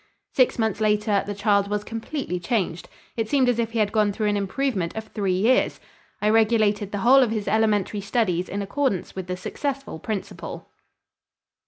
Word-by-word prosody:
Six 255 Hz, -, +3 dB
months 220 Hz, -2 st, 0 dB
later 210 Hz, -1 st, +2 dB
the 205 Hz, -, -3 dB
child 200 Hz, 0 st, +2 dB
was 210 Hz, 0 st, -2 dB
completely 225 Hz, -3 st, -4 dB
changed. 175 Hz, -3 st, -2 dB, 0.3 s
It 225 Hz, -2 st, -2 dB
seemed 270 Hz, -3 st, +3 dB
as 245 Hz, -1 st, +2 dB
if 230 Hz, -1 st, 0 dB
he -, -, -2 dB
had 210 Hz, -2 st, +2 dB
gone 210 Hz, -2 st, +2 dB
through 210 Hz, +1 st, -1 dB
an 205 Hz, -, +1 dB
improvement 200 Hz, -2 st, -1 dB
of 220 Hz, -, -3 dB
three 200 Hz, -3 st, -1 dB
years. 225 Hz, +8 st, +2 dB, 0.4 s
I 210 Hz, -, +4 dB
regulated 215 Hz, -2 st, +2 dB
the 205 Hz, -, -2 dB
whole 270 Hz, +2 st, +7 dB
of 250 Hz, -, +3 dB
his 215 Hz, -2 st, -3 dB
elementary 210 Hz, -2 st, +1 dB
studies 195 Hz, -4 st, 0 dB
in 200 Hz, +1 st, -3 dB
accordance 230 Hz, -2 st, -1 dB
with 190 Hz, -1 st, -5 dB
the 180 Hz, 0 st, -3 dB
successful 275 Hz, -, -4 dB
principle. 205 Hz, +2 st, -6 dB
210 Hz, 180 wpm, -24 LUFS, 200-230 Hz, 0.4 s, whole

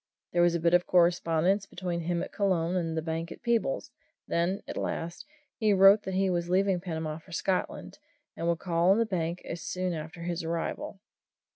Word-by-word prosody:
There 175 Hz, -, +3 dB
was 175 Hz, 0 st, +4 dB
a -, -, 0 dB
bit 170 Hz, +1 st, +2 dB
of 175 Hz, 0 st, +4 dB
correspondence 175 Hz, +2 st, +3 dB
between 175 Hz, -2 st, -4 dB
him 170 Hz, +1 st, -1 dB
at -, -, -7 dB
Colon 185 Hz, -4 st, 0 dB
and 165 Hz, -3 st, -1 dB
the 160 Hz, -, -1 dB
bank 165 Hz, +1 st, -3 dB
at -, -, -10 dB
Peebles 230 Hz, -, 0 dB, 0.4 s
then, 175 Hz, +4 st, 0 dB
at -, -, -5 dB
last, 170 Hz, -, -4 dB, 0.3 s
he 215 Hz, -3 st, +3 dB
wrote 195 Hz, +2 st, +7 dB
that 190 Hz, -, -3 dB
he 195 Hz, +1 st, +2 dB
was 175 Hz, -1 st, -1 dB
leaving 190 Hz, 0 st, +2 dB
Panama 160 Hz, -3 st, -4 dB
for 170 Hz, -, -18 dB
Scotland, 185 Hz, +2 st, -2 dB, 0.4 s
and 165 Hz, -, -3 dB
would 170 Hz, -1 st, +2 dB
call 170 Hz, 0 st, +1 dB
on 195 Hz, -, +6 dB
the 230 Hz, -, +3 dB
bank 175 Hz, -4 st, -2 dB
soon 180 Hz, +1 st, -3 dB
after 160 Hz, +1 st, -7 dB
his 175 Hz, 0 st, -3 dB
arrival. 165 Hz, +4 st, -3 dB
175 Hz, 190 wpm, -29 LUFS, 165-190 Hz, 0.4 s, wrote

